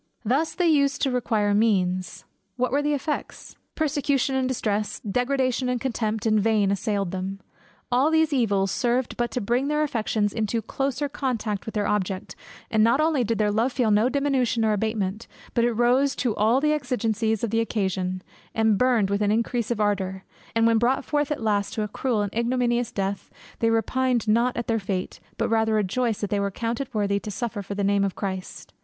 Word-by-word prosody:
Thus 275 +9 +1
they 360 - +1
used 280 -3 +2
the 270 - +2
required 215 -4 +1
means. 185 -4 0 0.3
What 250 -1 0
were 285 +2 +2
the 295 0 +1
effects? 295 +2 -5 0.2
Persecution 285 -3 0
and 260 -1 +1
distress, 215 -4 -1
degradation 255 +3 0
and 250 -1 0
contempt 225 -4 -2
in 215 -1 +3
vain 210 -2 +2
assailed 200 -2 -1
them 190 +1 -4 0.5
all 260 +5 +3
these 320 -1 +2
evils 200 -7 +1
served 245 +1 0
but 240 0 -1
to 250 - -2
bring 240 +6 0
their 300 +1 +1
affections 215 -6 0
into 225 +1 -1
closer 270 +5 -2
contact 230 -8 -3
with 220 - -6
their 205 -1 0
object; 195 -2 -2 0.4
and 220 -2 +4
not 235 +5 +4
only 310 -4 +2
did 230 0 -1
their 210 -1 +2
love 230 +5 +1
feel 240 -5 +1
no 215 +4 +4
diminution 265 -5 +1
or 215 - +2
abatement, 210 0 -2 0.3
but 235 - +2
it 240 0 +2
rose 250 +4 +2
to 235 -4 -1
all 225 +5 +3
the 300 +2 +2
exigencies 230 -6 -1
of 230 - -1
the 225 - +2
occasion, 190 -4 -1 0.3
and 220 -2 +3
burned 240 -6 +3
with 200 +1 0
an 205 0 +2
increase 230 +1 0
of 235 -3 -1
ardor; 190 -2 -1 0.3
and 230 0 +3
when 230 -1 +4
brought 250 +3 +1
forth 295 -1 0
at 290 - -2
last 205 -2 0
to 215 - -1
a - - -2
cruel 220 0 -1
and 205 - -4
ignominious 240 0 0
death, 195 0 -3 0.3
they 230 - +2
repined 240 +1 +1
not 235 +3 +2
at 235 - -2
their 225 -1 0
fate; 190 -2 -4 0.2
but - - 0
rather 220 -1 +2
rejoiced 215 +2 0
that 205 - -3
they 205 - +1
were 200 0 0
counted 235 +6 -3
worthy 200 -3 0
to 210 - -7
suffer 225 -1 -3
for 200 +1 -6
the 200 - -1
name 200 0 +2
of 195 -2 -1
Christ. 190 -2 -6
225 Hz, 200 wpm, -25 LUFS, 205-255 Hz, 0.5 s, and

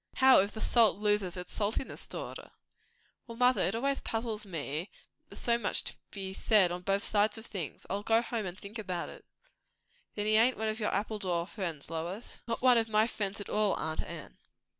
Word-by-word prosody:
"How, 265 -1 +7
if 200 +2 +1
the 220 - -6
salt 225 -5 +4
loses 205 -3 +1
its 180 0 -4
saltness, 215 +5 -2
daughter?" - - -7 0.8
"Well, 230 -1 -8
mother, 250 +1 +4
it 195 - +1
always 275 +4 0
puzzles 225 -2 -3
me, 160 0 -4 0.2
that - - -47
there's - - -7
so 235 0 +2
much 210 - 0
to - - -5 0.2
be 190 -2 -5
said 195 -3 +4
on 175 0 -4
both 195 +2 0
sides 210 0 +3
of 220 - -9
things! 180 - -6
I'll 200 +2 -2
go 225 +2 +3
home 230 -4 -3
and 180 +1 -6
think 205 +3 -8
about 185 -5 -3
it. - - -12 0.9
Then 205 - -1
he 215 0 +4
ain't 240 +3 +4
one 220 0 -1
o' - - +2
your 215 -1 -2
Appledore 195 -4 -1
friends, 170 -6 -5
Lois?" 175 +7 -5
"Not 230 +1 -3
one 250 -2 +7
of 225 0 -1
my 215 0 +4
friends 205 -3 -3
at 205 - -6
all, 210 -1 +2
aunt 160 0 -2
Anne." - - -9
210 Hz, 205 wpm, -31 LUFS, 190-225 Hz, 0.9 s, How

